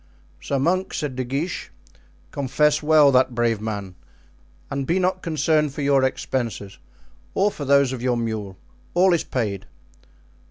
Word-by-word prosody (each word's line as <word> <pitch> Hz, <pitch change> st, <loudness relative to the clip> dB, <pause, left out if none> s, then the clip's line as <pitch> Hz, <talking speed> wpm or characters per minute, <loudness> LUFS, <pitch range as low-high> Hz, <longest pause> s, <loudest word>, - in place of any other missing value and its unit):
"Sir 140 Hz, -, -2 dB
monk," 185 Hz, +7 st, 0 dB
said 145 Hz, -4 st, -3 dB
De 130 Hz, -, -2 dB
Guiche, 140 Hz, +8 st, -3 dB, 0.6 s
"confess 145 Hz, +2 st, +1 dB
well 150 Hz, -2 st, +5 dB
that 130 Hz, -1 st, +3 dB
brave 115 Hz, -2 st, +1 dB
man; 100 Hz, -4 st, -4 dB, 0.8 s
and 140 Hz, -1 st, -3 dB
be 170 Hz, -, +2 dB
not 185 Hz, 0 st, 0 dB
concerned 155 Hz, -2 st, +1 dB
for 145 Hz, -, -3 dB
your 140 Hz, -1 st, +3 dB
expenses 115 Hz, -6 st, -3 dB, 0.6 s
or 205 Hz, +2 st, +2 dB
for 145 Hz, -, -6 dB
those 140 Hz, -1 st, +4 dB
of 125 Hz, -, -5 dB
your 125 Hz, -1 st, +1 dB
mule; 110 Hz, -5 st, -4 dB, 0.4 s
all 180 Hz, +1 st, +5 dB
is 170 Hz, -, +1 dB
paid." 105 Hz, -6 st, -3 dB
135 Hz, 150 wpm, -23 LUFS, 120-155 Hz, 0.8 s, well